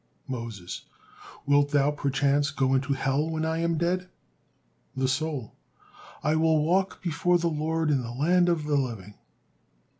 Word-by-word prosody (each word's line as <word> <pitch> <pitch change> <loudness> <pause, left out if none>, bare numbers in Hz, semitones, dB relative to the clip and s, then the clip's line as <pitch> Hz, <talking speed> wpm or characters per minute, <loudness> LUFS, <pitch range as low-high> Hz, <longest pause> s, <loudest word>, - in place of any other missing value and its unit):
'" - - -39
Moses: 110 -7 -7 0.6
"Wilt 145 0 +3
thou, 145 0 +3
perchance, 140 0 +1
go 135 -1 +1
into 135 +1 +1
Hell 135 +3 0
when 160 0 -2
I 160 0 -1
am 170 -1 0
dead?" 180 +2 -1 0.9
The 130 0 +1
soul: 135 -3 -2 0.7
"I 150 +2 +2
will 160 -1 +3
walk 185 +4 0
before 175 +1 +2
the 170 -1 0
Lord 160 +1 0
in 135 -3 +2
the 115 - -6
land 175 +8 +2
of 170 -3 +1
the 150 -1 +1
living." 110 -7 -3
150 Hz, 155 wpm, -27 LUFS, 135-160 Hz, 0.9 s, Wilt